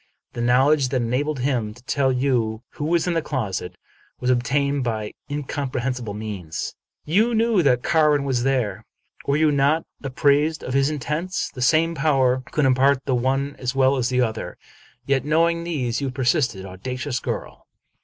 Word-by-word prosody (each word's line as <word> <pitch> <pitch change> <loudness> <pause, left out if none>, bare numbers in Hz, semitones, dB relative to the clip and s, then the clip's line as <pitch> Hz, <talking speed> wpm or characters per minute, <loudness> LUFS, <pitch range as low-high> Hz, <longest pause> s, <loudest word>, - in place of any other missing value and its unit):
The 120 - -4
knowledge 130 +3 +3
that 125 -1 0
enabled 135 +4 -1
him 120 -5 -1
to 125 - -17
tell 135 0 +1
you 125 -4 0
who 145 - -5
was 170 +1 +1
in 175 - 0
the 165 - +1
closet 95 - -4 0.4
was 125 - +1
obtained 140 +3 +1
by 110 -3 -3 0.2
incomprehensible 130 -5 -3
means. 100 -7 -5 0.2
" - - -55
You 230 +3 +3
knew 225 -3 +3
that 125 -5 +2
Carwin 150 -3 +3
was 130 -3 0
there. 120 -6 0 0.4
Were 140 +1 +2
you 155 -1 +3
not 145 +3 +2 0.2
ap 135 -2 -6
prised 150 +3 +2
of 125 - -4
his 135 +1 +3
intents? 155 +5 -3
The 125 - -8
same 160 +6 +3
power 135 -4 +2
CQuld 150 - 0
impart 135 +1 +3
the 135 - 0
one 135 +3 0
as 125 +1 -2
well 135 0 +4
as 130 -1 0
the 125 0 +1
other. 110 -2 -3 0.5
Yet, 135 -2 +1
knowing 165 +3 +2
these, 135 -8 -2
you 140 - -1
persisted. 130 - 0
Audacious 125 +7 -4
girl - - -6
135 Hz, 175 wpm, -23 LUFS, 125-150 Hz, 0.5 s, well